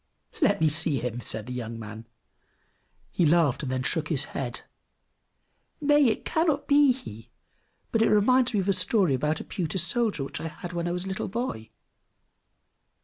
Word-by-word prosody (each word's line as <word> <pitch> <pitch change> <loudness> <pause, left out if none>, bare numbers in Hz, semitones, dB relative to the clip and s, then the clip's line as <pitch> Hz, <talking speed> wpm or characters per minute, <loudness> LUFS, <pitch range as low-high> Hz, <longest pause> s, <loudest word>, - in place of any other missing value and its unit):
"Let 205 -9 +3
me 160 - +3
see 155 -1 +2
him," 120 0 -3
said 110 -2 -3
the 125 - -6
young 115 -2 -5
man. 110 0 -9 1.0
He - - +1
laughed, 160 -4 +3
and 130 - -3
then 130 0 -1
shook 155 +3 -1
his 155 -5 0
head. 125 -3 -3 1.2
"Nay, 295 -2 +4
it 220 - -1
cannot 310 -3 +1
be 285 -1 +6
he; 115 - -8 0.6
but 225 - +2
he 225 - +5
reminds 250 +4 +4
me 210 -4 +1
of 190 - -2
a - - +4
story 190 - +2
about 150 +4 0
a - - -6
pewter 180 -2 -3
soldier 190 - +1
which 135 - -6
I 165 - -3
had 175 +2 -8
when 170 0 -2
I - - -1
was 180 +1 -3
a - - -6
little 190 0 -3
boy!" 215 - -4
175 Hz, 185 wpm, -27 LUFS, -, 1.2 s, be